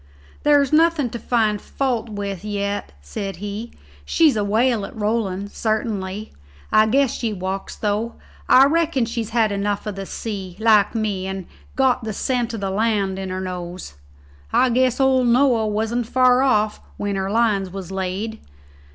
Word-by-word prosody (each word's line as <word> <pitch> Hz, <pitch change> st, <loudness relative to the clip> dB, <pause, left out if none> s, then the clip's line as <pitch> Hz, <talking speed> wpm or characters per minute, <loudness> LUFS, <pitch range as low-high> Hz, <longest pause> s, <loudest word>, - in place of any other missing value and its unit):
"There's 290 Hz, -1 st, +3 dB
nothing 315 Hz, -5 st, +3 dB
to 235 Hz, -, -5 dB
find 215 Hz, -3 st, +1 dB
fault 245 Hz, -4 st, -2 dB
with 200 Hz, -3 st, -5 dB
yet," 205 Hz, -1 st, -3 dB
said 195 Hz, -, -5 dB
he; 205 Hz, +5 st, -6 dB, 0.3 s
"she's 305 Hz, -, +3 dB
a 210 Hz, -, 0 dB
whale 225 Hz, +2 st, +2 dB
at -, -, -7 dB
rolling, 205 Hz, -3 st, -1 dB
sartinly. 215 Hz, -2 st, -2 dB, 0.4 s
I 215 Hz, 0 st, +5 dB
guess 270 Hz, +2 st, +2 dB
she 225 Hz, -3 st, -2 dB
walks, 190 Hz, 0 st, -4 dB
though. 215 Hz, +2 st, -2 dB, 0.3 s
I 260 Hz, +1 st, +8 dB
reckon 310 Hz, -4 st, +1 dB
she's 230 Hz, -1 st, -3 dB
had 220 Hz, -2 st, +2 dB
enough 200 Hz, +1 st, -1 dB
of 210 Hz, -, -3 dB
the 195 Hz, -1 st, -6 dB
sea, 195 Hz, -5 st, -5 dB
like 220 Hz, -1 st, +4 dB
me, 205 Hz, -4 st, -1 dB
and's 190 Hz, -2 st, -5 dB, 0.3 s
got 255 Hz, -2 st, +2 dB
the 220 Hz, -1 st, -3 dB
scent 245 Hz, +1 st, -1 dB
o' -, -, -4 dB
the 195 Hz, -2 st, -3 dB
land 200 Hz, -2 st, 0 dB
in 190 Hz, -1 st, -4 dB
her 185 Hz, 0 st, -3 dB
nose. 180 Hz, -, -6 dB, 0.6 s
I 255 Hz, -, +3 dB
guess 255 Hz, +1 st, +2 dB
old 260 Hz, -2 st, +3 dB
Noah 240 Hz, -2 st, +3 dB
wasn't 220 Hz, +3 st, -1 dB
far 255 Hz, 0 st, +4 dB
off 215 Hz, -5 st, +2 dB, 0.2 s
when 205 Hz, -1 st, -2 dB
her 190 Hz, 0 st, -2 dB
lines 210 Hz, -3 st, +1 dB
was 190 Hz, -1 st, -7 dB
laid. 195 Hz, +4 st, -3 dB
215 Hz, 165 wpm, -21 LUFS, 195-240 Hz, 0.6 s, I